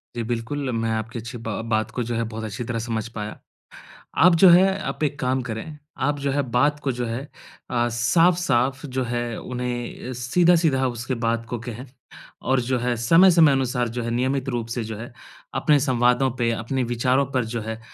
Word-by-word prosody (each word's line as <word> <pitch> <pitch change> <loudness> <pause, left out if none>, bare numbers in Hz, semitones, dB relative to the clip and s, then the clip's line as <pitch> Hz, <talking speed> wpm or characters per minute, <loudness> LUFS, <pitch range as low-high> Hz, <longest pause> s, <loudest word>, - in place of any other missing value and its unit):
जी, 120 - -2
बिल्कुल। 120 +4 -3
मैं 115 -1 -1
आपकी 110 +1 -3
अच्छी 115 +2 -7
बा 115 -1 -4
बात 110 0 +1
को 125 - -2
जो 120 +1 -3
है 115 - 0
बहुत 110 0 -6
अच्छी 110 +2 -4
तरह 115 0 -3
समझ 115 -1 -3
पाया। 105 0 -5 0.9
आप 180 -1 +7
जो 190 - +10
है 190 +3 +5
आप - - -4
एक 145 0 -2
काम 130 +1 +1
करें, 120 +6 -6 0.2
आप 145 +2 0
जो 140 0 -1
है 145 +1 +1
बात 145 +5 +2
को 140 -2 -1
जो 120 0 -3
है 115 +3 -3 0.5
अ, 120 -1 +1
साफ़-साफ़ 135 +1 +2
जो 130 -1 -2
है 120 -1 -3
उन्हें 125 0 -5
सीधा-सीधा 155 +2 +3
उसके 120 +1 -3
बात 115 0 0
को 120 - -3
कहें। 120 +3 -7 0.6
और 130 0 +2
जो 125 +1 -1
है 120 0 -1
समय-समय 165 +5 +6
अनुसार 125 -2 0
जो 120 +1 -4
है 115 - -3
नियमित 130 +3 -1
रूप 120 -3 -2
से 120 - -2
जो 110 0 -6
है 120 +2 -8 0.4
अपने 150 -1 +3
संवादों 125 -1 +2
पे 120 -1 +1
अपने 120 +4 -2
विचारों 125 +3 +1
पर 130 -2 +1
जो 115 - -1
है 110 +1 -5
125 Hz, 195 wpm, -23 LUFS, 115-135 Hz, 0.9 s, जो